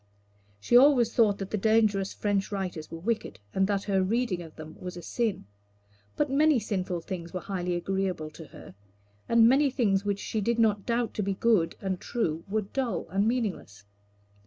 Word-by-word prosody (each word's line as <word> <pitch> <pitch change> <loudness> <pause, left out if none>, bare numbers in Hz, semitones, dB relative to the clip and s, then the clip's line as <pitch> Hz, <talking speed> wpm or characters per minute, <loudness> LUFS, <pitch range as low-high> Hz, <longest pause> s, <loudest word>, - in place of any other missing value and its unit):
She 170 - +1
always 250 -3 +6
thought 210 -4 +3
that 195 -1 -6
the 215 - -1
dangerous 215 -2 +2
French 205 -1 -1
writers 180 -6 -4
were 165 - -7
wicked 210 - -3
and 190 0 +2
that 200 -1 0
her 195 -2 +1
reading 210 -1 0
of 165 -2 -11
them 155 0 -10
was 180 -1 -7
a - - -7
sin; 225 - -2 0.7
but 295 - +1
many 300 +1 +4
sinful 185 -4 -3
things 170 -1 -7
were - - -1
highly 180 -1 -3
agreeable 180 -3 -2
to 160 +1 -11
her, - - -13 0.6
and 230 -1 +6
many 275 +3 +4
things 210 -7 +1
which 205 -1 -1
she 215 +1 -3
did 235 +3 0
not 210 -3 +2
doubt 235 -1 0
to - - -2
be 195 -1 -1
good 210 -6 +2
and 190 -2 -3
true 165 -9 -2
were 215 +2 0
dull 245 +4 -3
and 195 +4 +1
meaningless. 200 - -3
200 Hz, 185 wpm, -28 LUFS, 180-230 Hz, 0.7 s, always